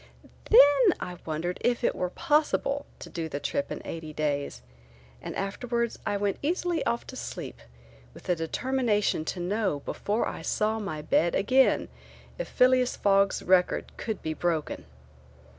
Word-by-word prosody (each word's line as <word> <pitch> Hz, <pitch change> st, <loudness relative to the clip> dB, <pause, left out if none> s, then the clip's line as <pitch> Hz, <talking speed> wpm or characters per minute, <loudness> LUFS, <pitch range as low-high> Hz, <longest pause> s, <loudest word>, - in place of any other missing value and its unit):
Then 285 Hz, -, +7 dB
I 180 Hz, 0 st, -6 dB
wondered 165 Hz, +3 st, -2 dB
if 245 Hz, 0 st, +1 dB
it -, -, +2 dB
were 180 Hz, -, -2 dB
possible 285 Hz, -, +1 dB
to -, -, -10 dB
do 165 Hz, -2 st, -5 dB
the 145 Hz, -, -4 dB
trip 280 Hz, -, -2 dB
eighty 160 Hz, -2 st, -6 dB
days 145 Hz, -, -2 dB, 0.6 s
and -, -, -6 dB
afterwards 235 Hz, +4 st, -2 dB
I 205 Hz, -, +1 dB
went 200 Hz, -1 st, -1 dB
easily 340 Hz, +1 st, 0 dB
off 235 Hz, -, -1 dB
to 260 Hz, -, -9 dB
sleep -, -, -6 dB, 0.6 s
with -, -, -13 dB
the 180 Hz, -, +1 dB
determination 210 Hz, +1 st, 0 dB
to 180 Hz, -, -3 dB
know 190 Hz, -4 st, -1 dB
before 210 Hz, +3 st, -1 dB
I -, -, -5 dB
saw 215 Hz, +1 st, 0 dB
my 155 Hz, -8 st, -5 dB
bed 165 Hz, +2 st, +2 dB
again 260 Hz, +5 st, +3 dB, 0.5 s
if -, -, -3 dB
Phileas 255 Hz, 0 st, +3 dB
Fogg's 195 Hz, -1 st, +2 dB
record 180 Hz, -1 st, +2 dB
could 220 Hz, -3 st, -4 dB
be 155 Hz, -, -2 dB
broken. 160 Hz, -2 st, -2 dB
205 Hz, 150 wpm, -28 LUFS, 170-255 Hz, 0.6 s, Then